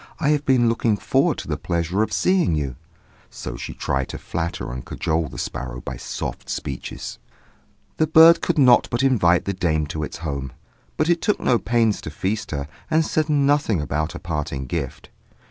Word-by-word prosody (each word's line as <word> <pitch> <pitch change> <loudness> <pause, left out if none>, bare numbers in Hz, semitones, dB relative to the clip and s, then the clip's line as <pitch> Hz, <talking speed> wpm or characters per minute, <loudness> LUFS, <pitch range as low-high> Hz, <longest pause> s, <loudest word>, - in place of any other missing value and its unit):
I 150 -3 +1
have 150 -1 +1
been 125 -3 +4
looking 115 -2 +1
forward - - +1
to - - -6
the - - -2
pleasure 85 +3 -1
of 110 - 0
seeing 185 - +2
you." 70 -4 -2 0.5
So 65 - -7
she - - -7
tried 65 -1 -1
to - - -5
flatter 85 -3 -4
and 65 0 -6
cajole 80 +4 -1
the - - -10
sparrow - - -4
by - - -6
soft - - -5
speeches. 70 -4 -5 0.8
The 155 - +2
bird 165 +2 +8
could - - 0
not 125 -4 +6
but 120 +2 0
invite 95 -10 +3
the 100 - -1
dame 80 -4 0
to 80 - -3
its 75 - -5
home; 70 -3 -4 0.4
but 155 - +1
it 170 -1 +2
took 210 - +1
no 120 -2 +2
pains 115 -3 +1
to - - -6
feast 95 +8 -3
her, 70 -2 -3 0.2
and 160 0 +3
said 155 0 0
nothing 145 - +2
about 75 +2 -2
a - - -6
parting 75 -4 -3
gift. 60 - -5
95 Hz, 190 wpm, -22 LUFS, -, 0.8 s, bird